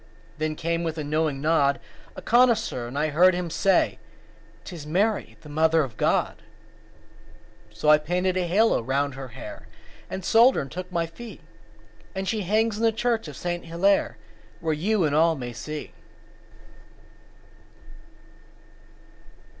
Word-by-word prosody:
Then 155 0 -1
came, 170 +1 -2
with 165 -1 -3
a 155 - -3
knowing 150 -1 -1
nod, 145 -3 +2 0.4
A - - -9
connoisseur, 230 - +2
and 125 +4 -7
I 155 +1 +1
heard 175 +5 +5
him 175 -2 -3
say; 190 +2 +2 0.6
"'Tis 155 0 -9
Mary, 200 +7 0
the - - -13
Mother 160 +1 +3
of 125 -5 -7
God." - - +1 1.3
So 105 +8 -5
I 150 0 +7
painted 180 +4 -1
a 180 -1 0
halo 210 - +3
round 140 +3 -1
her 135 0 -7
hair, 120 - -10 0.4
And 190 - -5
I - - -8
sold 235 +4 +6
her - - 0
and 135 - -11
took 180 +2 -7
my 170 -1 0
fee, 210 +5 -11 0.7
And 190 0 -3
she 215 +3 -1
hangs 215 +3 +1
in 225 - -3
the 225 - +4
church 225 -2 -1
of 145 -3 -9
Saint 175 -1 -4
Hillaire, 170 - +1 0.4
Where 160 -1 -1
you 190 +6 +1
and 145 - 0
all 165 +1 +4
may 125 -4 -6
see. 150 +6 -7
165 Hz, 155 wpm, -25 LUFS, 150-195 Hz, 1.3 s, I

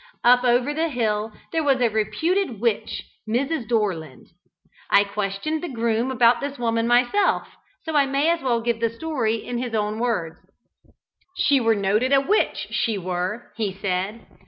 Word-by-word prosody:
Up 245 +1 +6
over 250 +3 +2
the 325 +2 0
hill 220 -4 -1 0.2
there 325 -1 0
was 275 -3 +2
a 245 - +4
reputed 225 - -1
witch, 230 -1 -1 0.3
Mrs. 265 +2 -1
Dorland. 180 - -2 0.6
I 200 - +6
questioned 205 +9 -3
the 350 - -4
groom 235 0 0
about 240 -2 +4
this 285 0 -4
woman 230 -1 0
myself, 245 +11 +3 0.4
so 320 -1 -4
I 280 -2 +4
may 275 +4 +1
as 340 -1 -1
well 240 -3 0
give 235 0 -1
the 230 0 +1
story 230 -3 -1
in 240 +2 -4
his 245 -2 -3
own 210 0 -1
words. 205 -10 -1 1.0
"She 280 -2 +3
were 230 -2 +3
a 210 - -2
noted 215 +8 +2
witch, 425 +3 +1
she 225 -3 0
were," 185 +5 -4
he 215 -3 -1
said. 195 +3 -2
235 Hz, 165 wpm, -23 LUFS, 210-270 Hz, 1.0 s, Up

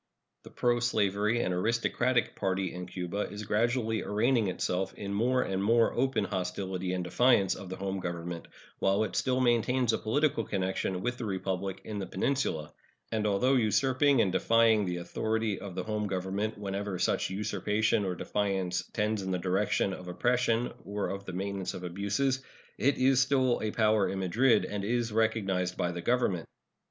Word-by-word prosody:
The - - -13
proslavery 115 -2 +1
and 90 - -1
aristocratic 115 +5 +1
party 95 -1 -1
in 90 0 -6
Cuba 90 +3 -3
is 105 +1 -6
gradually 110 +1 +1
arraigning 110 +2 +1
itself 90 +1 -2
in 100 -1 -5
more 125 +5 +2
and 95 0 -2
more 115 +2 +3
open 130 -3 +1
hostility 95 -1 -3
and 90 -1 -1
defiance 100 +1 +3
of 95 - -8
the 95 - -4
home 95 0 -3
government, 85 -1 -5 0.3
while 100 +2 +2
it 110 - -4
still 130 -1 +1
maintains 120 0 +2
a - - 0
political 140 +2 +1
connection 95 -2 -2
with 120 0 -2
the 120 - -3
Republic 95 -1 -3
in 105 -2 -5
the 95 - -4
peninsula; 95 - -1 0.4
and 110 -2 0
although 105 +7 +2
usurping 130 +3 +3
and 95 - +2
defying 115 0 +4
the 90 -1 -2
authority 110 +4 -1
of 95 -3 -8
the - - -2
home 105 -1 -2
government 100 +3 -2
whenever 100 -1 -3
such - - +1
usurpation 105 +2 0
or 95 -2 -2
defiance 95 -2 -1
tends 105 -1 0
in 95 - -4
the 90 - 0
direction 95 +2 0
of 90 -1 -8
oppression 120 +4 +1
or 100 0 -3
of 100 0 -5
the 95 - -5
maintenance 95 0 -3
of 90 - -7
abuses, 100 +9 -1 0.4
it 140 +2 +2
is 130 0 +4
still 130 -2 +2
a 110 - -1
power 110 -1 +2
in 95 - -3
Madrid, 110 +7 +3
and 100 -1 -4
is 120 +2 0
recognized 100 -5 0
by 90 - 0
the 85 0 -5
Government. 110 -7 0
105 Hz, 170 wpm, -30 LUFS, 95-115 Hz, 0.4 s, defying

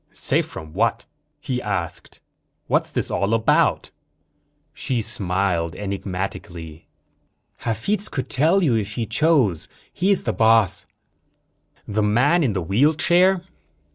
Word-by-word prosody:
"Safe - - 0
from 80 -1 -10
what?" - - 0 0.3
he 125 -2 -3
asked. 90 -5 -5 0.4
"What's - - +1
this - - -1
all 100 +3 +1
about?" 110 -1 +1 0.8
She 125 -3 -2
smiled 90 -5 -1
enigmatically. 90 -5 -6 0.7
"Hafitz 200 - -1
could 130 - -4
tell 165 +8 +2
you, 140 -8 +2
if 105 -1 -2
he 115 - -2
chose. 115 - +1 0.3
He's 195 +2 +2
the - - -1
boss." 110 -4 +3 1.0
"The 105 +1 -1
man 125 +11 +3
in 120 -7 +1
the 95 -3 -2
wheelchair?" 160 - +3
110 Hz, 115 wpm, -22 LUFS, 95-145 Hz, 1.0 s, boss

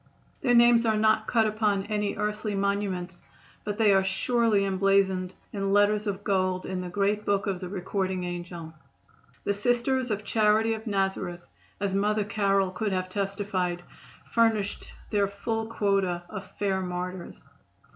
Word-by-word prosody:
Their 245 -2 +3
names 235 0 +6
are 220 -2 +2
not 215 0 +3
cut 225 -2 +3
upon 210 -2 +1
any 210 -1 -1
earthly 210 0 -2
monuments, 195 -3 -2 0.4
but 205 -1 -3
they 215 -3 +5
are 195 0 +4
surely 210 +2 +2
emblazoned 190 -1 +1 0.2
in 195 -1 -1
letters 205 +1 +3
of 200 0 -3
gold 185 -2 0
in 185 -1 -3
the 180 - -5
great 205 +3 0
book 200 -1 +1
of 195 -3 -2
the 180 -1 -6
Recording 190 -1 -2
Angel. 175 -2 -6 0.7
The 200 - +1
Sisters 245 +4 +1
of 210 -1 -2
Charity 220 +1 +3
of 220 +1 -7
Nazareth, 190 -3 -2 0.3
as 200 -1 -1
Mother 210 +2 +1
Carroll 195 -2 +1
could 200 +2 -2
have 185 0 -2
testified, 195 -2 -2 0.5
furnished 225 -3 +1 0.2
their 205 -2 +2
full 220 +3 -3
quota 195 -5 0
of 195 -2 -7
fair 195 -2 0
martyrs. 180 0 -5
200 Hz, 150 wpm, -27 LUFS, 190-215 Hz, 0.7 s, names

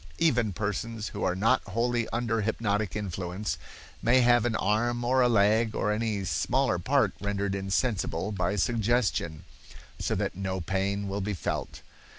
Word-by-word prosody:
Even 120 -10 +2
persons 105 +3 -3
who - - -5
are 90 - +1
not 115 +7 +3
wholly 115 +3 0
under 115 -1 0
hypnotic 105 -2 -1
influence 90 -4 -3 0.4
may 125 +2 +4
have 120 -1 +4
an 115 -2 0
arm 120 +5 +1
or 130 +2 +3
a 125 - +4
leg, 110 +1 +3
or 105 - 0
any 105 -2 -1
smaller 85 -5 +1
part - - +2
rendered 100 -1 -1
insensible 95 -1 -1
by 100 0 0
suggestion, 105 -6 0 0.6
so - - -1
that - - -1
no 95 0 -3
pain 100 +3 -1
will 100 +1 -2
be 100 +1 -2
felt. - - -4
105 Hz, 155 wpm, -28 LUFS, 95-115 Hz, 0.6 s, may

